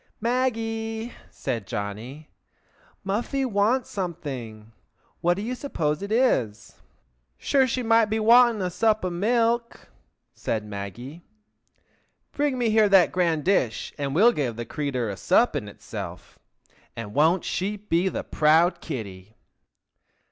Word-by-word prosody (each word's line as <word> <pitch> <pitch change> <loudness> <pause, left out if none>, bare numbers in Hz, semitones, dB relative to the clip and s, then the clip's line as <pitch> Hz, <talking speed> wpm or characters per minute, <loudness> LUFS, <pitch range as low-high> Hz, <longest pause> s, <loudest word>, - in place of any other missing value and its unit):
"Maggie," 225 -1 -2 0.2
said 115 -7 -4
Johnny, 115 +9 -6 0.7
"Muffy 240 +7 -1
wants 225 +3 +1
something! 125 - -6 0.5
What 175 +1 +2
do 200 - -5
you 240 +3 -3
suppose 160 - -2
it 200 +1 -5
is?" 120 - 0 0.6
"Sure 270 -2 +2
she 255 +1 -2
might 225 0 +4
be 220 +1 -1
wanting 230 -1 +5
a 180 - -2
sup 215 +1 +1
o' 180 - -1
milk!" 235 +5 0 0.4
said 110 -1 -3
Maggie. 105 - -7 1.1
"Bring 285 -2 0
me 235 -3 +1
here 215 -1 +4
the 195 -3 +6
grand 170 -4 +1
dish 155 - 0
and 140 -1 -3
we'll 220 +8 +6
give 130 - -2
the 120 +1 -5
crature 130 -3 -2
a 100 - -4
sup 185 - +2
in 125 -8 -3
itself, 100 - -9 0.6
and 115 -3 -7
won't 160 +5 +3
she 200 +3 -2
be 190 -2 0
the - - -4
proud 160 +4 +3
kitty!" 105 - -7
180 Hz, 135 wpm, -25 LUFS, -, 1.1 s, the